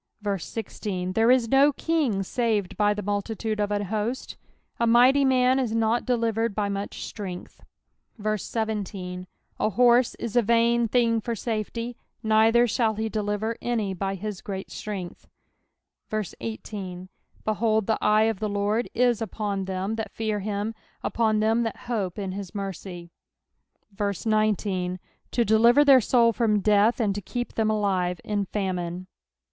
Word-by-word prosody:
16 185 Hz, -1 st, -4 dB
There 225 Hz, +3 st, +3 dB
is 250 Hz, -2 st, +4 dB
no 275 Hz, +4 st, +5 dB
kin^ 275 Hz, -11 st, 0 dB
saved 220 Hz, -4 st, -1 dB
by 210 Hz, 0 st, +3 dB
the 210 Hz, -, -4 dB
multitude 210 Hz, +2 st, -2 dB
of 205 Hz, -1 st, +1 dB
an 205 Hz, 0 st, 0 dB
host; 220 Hz, +5 st, -3 dB, 0.4 s
a 235 Hz, -, +2 dB
mighty 250 Hz, +4 st, +6 dB
man 260 Hz, 0 st, +3 dB
is 235 Hz, -4 st, -1 dB
not 225 Hz, +2 st, +1 dB
delivered 230 Hz, -3 st, 0 dB
by 205 Hz, -1 st, 0 dB
much 200 Hz, 0 st, -4 dB
strength. 185 Hz, -4 st, -7 dB, 0.6 s
17 205 Hz, -3 st, -3 dB, 0.3 s
An 215 Hz, -, +1 dB
horse 245 Hz, +2 st, +4 dB
is 235 Hz, -1 st, -5 dB
a 240 Hz, -, +6 dB
vain 235 Hz, +1 st, +3 dB
thing 230 Hz, -1 st, +2 dB
for 235 Hz, +1 st, -3 dB
safety; 230 Hz, +2 st, -3 dB, 0.3 s
neither 220 Hz, +2 st, +4 dB
shall 225 Hz, -1 st, +1 dB
he 220 Hz, +1 st, -2 dB
deliver 215 Hz, +1 st, -2 dB
any 220 Hz, -5 st, -1 dB
by 195 Hz, +1 st, -2 dB
his 205 Hz, 0 st, -5 dB
great 190 Hz, -1 st, -6 dB
strength. 195 Hz, -4 st, -6 dB, 0.8 s
18 205 Hz, -3 st, -5 dB, 0.4 s
Behold, 215 Hz, 0 st, +1 dB
the 220 Hz, -, -1 dB
eye 215 Hz, +1 st, +4 dB
of 220 Hz, -3 st, 0 dB
the 215 Hz, -, -1 dB
Lord 205 Hz, +3 st, 0 dB
is 240 Hz, -1 st, +2 dB
upon 205 Hz, -3 st, -3 dB
them 190 Hz, +3 st, -3 dB
that 220 Hz, -2 st, -3 dB
fear 215 Hz, -2 st, -1 dB
him, 205 Hz, +2 st, -3 dB, 0.3 s
upon 220 Hz, -2 st, +1 dB
them 225 Hz, +2 st, +2 dB
that 225 Hz, -2 st, -2 dB
hope 210 Hz, -7 st, -2 dB
in 195 Hz, -2 st, -3 dB
his 195 Hz, +1 st, -7 dB
mercy; 185 Hz, -3 st, -6 dB, 1.1 s
19 205 Hz, -4 st, 0 dB, 0.3 s
To 235 Hz, -, +1 dB
deliver 235 Hz, +7 st, +5 dB
their 270 Hz, -3 st, +7 dB
soul 230 Hz, 0 st, +3 dB
from 215 Hz, -2 st, +2 dB
death, 210 Hz, +4 st, +3 dB
and 210 Hz, -4 st, +1 dB
to 205 Hz, -, -4 dB
keep 245 Hz, +5 st, -4 dB
them 220 Hz, -1 st, +1 dB
alive 190 Hz, -5 st, 0 dB
in 205 Hz, -1 st, -1 dB
famine. 185 Hz, -3 st, -3 dB
215 Hz, 150 wpm, -25 LUFS, 200-230 Hz, 1.1 s, their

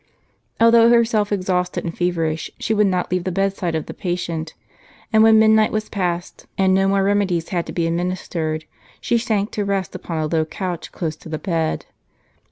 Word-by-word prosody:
Although 230 Hz, 0 st, +6 dB
herself 225 Hz, -3 st, +3 dB
exhausted 185 Hz, -2 st, -1 dB
and 165 Hz, -, -4 dB
feverish, 165 Hz, -3 st, -1 dB
she 220 Hz, -, -1 dB
w^ould 210 Hz, -1 st, +3 dB
not 180 Hz, -2 st, -1 dB
leave 180 Hz, -1 st, 0 dB
the 185 Hz, -, -2 dB
bedside 195 Hz, -2 st, -1 dB
of 155 Hz, -, -2 dB
the -, -, -7 dB
patient; 170 Hz, -3 st, -4 dB, 0.6 s
and 220 Hz, -, +6 dB
when 220 Hz, 0 st, +7 dB
midnight 220 Hz, 0 st, +5 dB
was 215 Hz, 0 st, -2 dB
past, 180 Hz, -3 st, -3 dB
and 190 Hz, -1 st, +3 dB
no 195 Hz, +1 st, +3 dB
more 195 Hz, 0 st, +2 dB
remedies 195 Hz, -4 st, +1 dB
had 175 Hz, -3 st, -2 dB
to -, -, -5 dB
be 170 Hz, -, -1 dB
administered, 165 Hz, -2 st, -2 dB, 0.3 s
she 235 Hz, -, +1 dB
sank 215 Hz, -3 st, -1 dB
to 210 Hz, -, -2 dB
rest 195 Hz, -2 st, -2 dB
upon 165 Hz, -, -5 dB
a 155 Hz, -, 0 dB
low 160 Hz, +1 st, +1 dB
couch 175 Hz, +2 st, -5 dB
close 160 Hz, -3 st, -3 dB
to -, -, -12 dB
the 155 Hz, -, -3 dB
bed. 165 Hz, -2 st, -2 dB
185 Hz, 185 wpm, -21 LUFS, 170-205 Hz, 0.6 s, when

